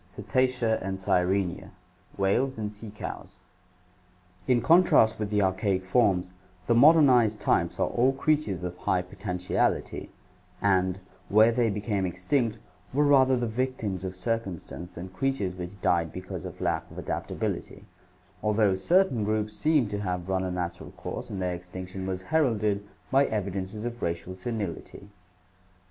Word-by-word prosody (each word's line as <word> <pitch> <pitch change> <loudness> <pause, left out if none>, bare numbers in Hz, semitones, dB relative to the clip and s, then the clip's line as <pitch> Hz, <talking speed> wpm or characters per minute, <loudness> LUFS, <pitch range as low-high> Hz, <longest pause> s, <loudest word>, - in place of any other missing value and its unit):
Cetacea 125 -3 0
and 95 0 -3
Sirenia, 95 0 0 0.5
whales 115 +7 +1
and 105 -1 -4
sea 105 +1 -9
cows. 105 - -8 1.1
In 125 -1 +4
contrast 120 -5 +5
with 105 -1 -2
the 105 -1 +2
archaic 95 0 0
forms, 95 -3 +2 0.3
the 120 - +3
modernized 125 -5 +6
types - - +1
are - - +3
all 125 +3 +2
creatures 135 - 0
of 90 0 -4
high 90 -1 0
potentiality, 90 -1 -2 0.5
and, 95 -2 +2 0.3
where 110 +3 +6
they 115 -1 +2
became 100 -2 -1
extinct, 105 +6 0 0.3
were 145 +3 +2
rather 130 -2 +5
the 120 - -1
victims 110 -5 -2
of 95 0 -4
circumstance 95 -4 -4
than 90 +2 -8
creatures 100 -2 -1
which 90 +2 -8
died 85 -2 +2
because 90 0 -7
of - - -8
lack - - -1
of - - -13
adaptability, - - -4 0.6
although 105 -2 +3
certain 130 - +2
groups 105 0 -1
seem 150 -4 +2
to 100 - -3
have 90 -3 -3
run 95 -1 0
a 95 - -2
natural 90 -1 -4
course - - -6
and 100 - -5
their 90 -1 -1
extinction 95 +2 -7
was 95 -1 -3
heralded 110 -9 +2 0.3
by 135 +1 +5
evidences 100 +1 -3
of 120 0 -5
racial 85 +2 -3
senility. 100 -1 -5
100 Hz, 145 wpm, -27 LUFS, 95-120 Hz, 1.1 s, modernized